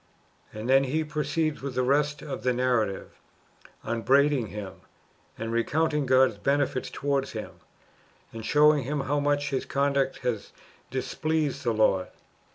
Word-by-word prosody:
"^ - - -6
And 110 - -5
then 135 +1 +5
he 155 +5 0
proceeds 150 0 -2
with 135 -2 -5
the 130 - +1
rest 145 +2 +1
[of 145 - -5
the 125 0 +1
narrative], 120 -6 -1 0.6
upbraiding 135 +2 +2
him, 100 -2 -8 0.6
and 115 +1 -4
recounting 150 +5 0
God's 130 -4 +4
benefits 140 +1 0
towards 140 -1 -2
him, - - -6 0.8
and 115 0 -7
[showing 150 +3 +4
him] 140 +3 -2
how 145 +2 0
much 145 0 0
his 135 - -1
conduct 140 -1 0
had 120 -4 -1 0.5
displeased 145 +3 -2
the 120 - +1
Lord. 110 -4 +2
135 Hz, 145 wpm, -27 LUFS, 125-145 Hz, 0.8 s, then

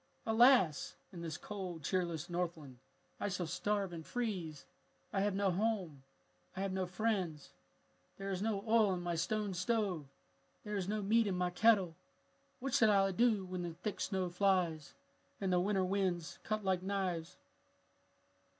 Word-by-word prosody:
"Alas! 225 - +5 0.2
in 170 - -7
this 165 -2 -4
cold, 185 -6 -6
cheerless 170 -1 -1
Northland 170 -7 -4 0.4
I 205 - -1
shall 180 -2 -2
starve 200 +2 -1
and 165 -1 -6
freeze. 180 - -3 0.5
I 195 - +1
have 200 -1 +1
no 200 -1 +2
home. 185 -7 -1 0.6
I - - -1
have 195 -1 -1
no 190 -1 -1
friends. 180 -6 -1 0.7
"There 195 0 -4
is 185 -1 -2
no 210 -2 -1
oil 220 -4 +4
in 175 - -4
my 175 -1 -1
stone 205 +4 -1
stove! 185 -5 0 0.6
There 210 -1 -4
is 190 -2 -1
no 210 0 -1
meat 220 +2 +3
in 190 - 0
my 180 0 0
kettle. 190 -3 +4 0.6
What 270 0 -3
shall 220 - +5
I 195 -1 +4
do 215 -1 +2
when 180 -1 -4
the 170 -2 -4
thick 200 +4 -4
snow 185 -3 -1
flies 175 -5 +1 0.4
and 190 -2 0
the 180 - +4
winter 190 0 +1
winds 185 -3 -1
cut 215 -2 -2
like 185 -1 +2
knives?" 185 -4 -2
190 Hz, 160 wpm, -35 LUFS, 175-210 Hz, 0.7 s, Alas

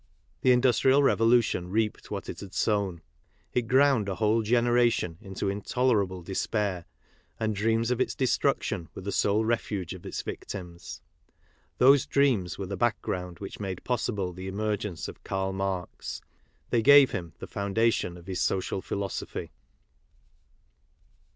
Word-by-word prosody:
The 130 - +5
Industrial 130 +2 +4
Revolution 115 -8 +3
reaped 105 +2 -1
what - - -5
it - - -6
had 100 -2 -10
sown. 100 -6 0 0.5
It 120 -2 0
ground 130 -5 +4
a 95 - -2
whole 110 +2 +2
generation 120 -6 +2
into 95 -1 -4
intolerable 100 -2 0
despair, 95 -1 -2 0.5
and 110 -1 0
dreams 115 +3 +1
of 125 0 0
its - - 0
destruction 120 - 0
were - - -7
the 100 - -3
sole 105 +3 +2
refuge 105 -6 -2
of 95 - -10
its - - -5
victims. 90 -3 -7 0.8
Those 135 +2 +5
dreams 125 -11 +2
were 100 - -4
the 100 +2 -4
background 90 -5 -1
which 100 - -8
made 95 -3 -5
possible 105 -7 -1
the 95 +2 -7
emergence 105 -3 -3
of - - -11
Karl 95 0 -2
Marx. 95 -2 -4 0.5
They 120 - +3
gave 140 +3 +7
him 85 -3 -5
the - - -7
foundation 100 -3 0
of 85 - -14
his 95 -1 -3
social 95 0 0
philosophy. 100 0 -4
105 Hz, 140 wpm, -28 LUFS, 95-120 Hz, 0.8 s, gave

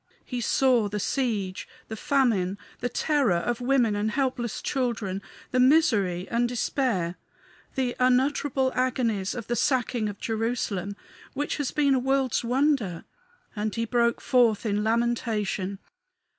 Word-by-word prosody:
He 250 -2 -4
saw 245 -2 +3
the 210 +1 -3
siege, 205 -5 -2 0.2
the 220 - -5
famine, 220 -7 +1 0.2
the 245 - -2
terror 280 - +1
of 240 +8 -1
women 245 -4 +2
and 205 +1 0
helpless 250 -2 -1
children, 230 -8 -2 0.3
the 255 - +1
misery 220 - +3
and 240 +1 +1
despair, 225 -8 -1 0.6
the 255 -3 -1
unutterable 260 +1 +2
agonies 235 -6 0
of 235 -3 -5
the 240 - -1
sacking 240 -4 +1
of 205 - -7
Jerusalem, 220 -4 -2 0.4
which 290 +1 -2
has 290 -3 -1
been 285 -2 +2
a 260 - +3
world's 265 -1 +1
wonder; 250 - 0 0.5
and 210 0 -2
he 230 0 -1
broke 235 0 +1
forth 240 -4 +3
in 210 -1 0
lamentation. 220 -4 0
235 Hz, 135 wpm, -26 LUFS, 210-260 Hz, 0.6 s, saw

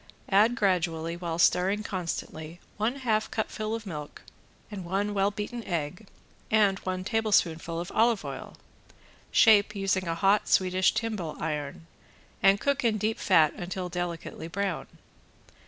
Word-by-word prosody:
Add 215 +5 +4
gradually 170 -5 0
while 170 -2 -4
stirring 190 +4 +3
constantly, 170 -3 -5 0.2
one 220 +5 0
half 225 -5 0
cupful 215 0 -3
of 225 -1 -7
milk 150 -6 -7 0.5
and 200 -3 -6
one 195 +4 -1
well 200 0 +2
beaten 210 +3 -5
egg 175 +3 -4 0.4
and 205 -3 +3
one 185 0 -3
tablespoonful 185 -6 +1
of 175 +2 -5
olive 225 -1 +2
oil. - - -7 0.7
Shape, 215 -2 +5
using 190 -2 0
a 165 - -1
hot 200 +4 +3
Swedish 185 +1 +3
timbale 215 -8 -3
iron, 150 0 -4 0.6
and 195 +1 +5
cook 280 +2 0
in 225 -2 +2
deep 215 +2 -1
fat 160 -5 +4
until 180 +1 -5
delicately 175 -2 -5
brown. 195 0 -3
195 Hz, 140 wpm, -28 LUFS, 170-215 Hz, 0.7 s, Shape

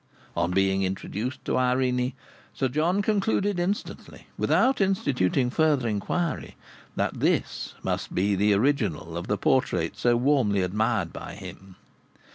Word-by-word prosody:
On 85 +1 +1
being 95 +1 +2
introduced 100 +6 -3
to - - 0
Irene, 125 0 +1 0.4
Sir 130 - 0
John 170 +9 +1
concluded 205 -2 +1
instantly, 190 +4 -4
without 265 -4 +2
instituting 130 - +1
further 150 -5 +2
inquiry, 115 - -2 0.4
that - - -1
this - - 0
must - - -3
be 100 +3 +2
the 105 +2 +2
original 105 - 0
of 85 - -4
the 105 - 0
portrait 90 -7 +1
so 120 -1 +2
warmly 120 -7 +2
admired 100 -2 0
by - - -7
him. 95 -1 -11
125 Hz, 130 wpm, -26 LUFS, 95-150 Hz, 0.4 s, being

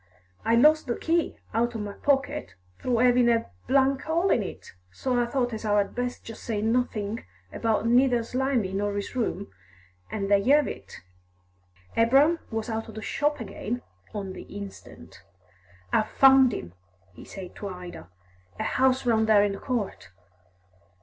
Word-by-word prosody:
I 230 - +3
loss 305 +6 +6
the 240 -3 -3
key 335 +1 0 0.2
out 235 +1 0
o' - - -3
my 205 -1 -5
pocket, 285 +4 -1 0.2
through 245 -2 0
'avin' 245 -1 +5
a 230 - +1 0.5
hole 335 +6 0
in - - +3
it, 195 - -8 0.2
so 250 - 0
I 240 - 0
thought 245 -1 -1
as 220 - -5
'ow 210 -1 +2
I'd 200 -1 +1
best 245 0 -3
just 225 - -9
say 220 -3 -2
nothink 220 - -1 0.3
about 225 -1 0
neither 245 0 +4
Slimy 250 -5 -1
nor 205 +1 -1
his 205 +5 -4
room, 210 -5 -2 0.6
an' 200 -2 -3
there 200 0 +4
y'ave 285 +8 +3
it!" - - -14 0.9
Abraham 275 +9 +4
was 225 -1 -3
out 225 -1 -3
of 220 - -11
the 220 - -6
shop 295 0 0
again 225 +2 -5 0.3
on 195 -2 -5
the - - -8
instant. 95 - -10 0.7
"I've 215 - +2
found 265 -2 +6
him," 85 - -6 0.4
he - - -12
said 185 -2 -9
to 205 - -5
Ida. 180 - -9 0.5
"A - - -1
house 260 0 +2
round 220 -2 +2
there 205 -2 +6
in 205 - +1
the 195 - -6
court." 230 - -3
230 Hz, 165 wpm, -26 LUFS, 205-255 Hz, 0.9 s, loss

